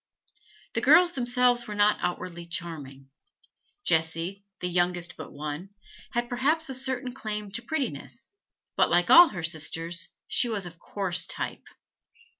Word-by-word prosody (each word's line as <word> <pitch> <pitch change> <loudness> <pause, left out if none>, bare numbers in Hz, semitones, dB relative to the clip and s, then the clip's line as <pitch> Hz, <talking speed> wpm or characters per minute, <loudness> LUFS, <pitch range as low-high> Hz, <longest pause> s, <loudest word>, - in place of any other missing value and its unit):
The - - +1
girls 355 -1 +6
themselves 245 -2 +1
were 210 - -5
not 205 0 +4
outwardly 175 -1 -4
charming; 140 -6 -6 0.7
Jessie, 165 +4 0 0.2
the 180 - -1
youngest 175 0 0
but 155 - -9
one, 150 +7 -6 0.4
had 240 0 0
perhaps 280 +6 +1
a - - -2
certain 260 -1 -2
claim 210 -4 -4
to 235 - -3
prettiness, 280 +8 -4 0.4
but, - - +4
like 175 +1 +3
all 345 +1 +11
her 175 - -6
sisters, 165 +2 -3 0.2
she 240 - +2
was 205 -4 -2
of 170 -1 -10
coarse 185 -2 -1
type. - - -4
190 Hz, 140 wpm, -27 LUFS, 170-245 Hz, 0.7 s, all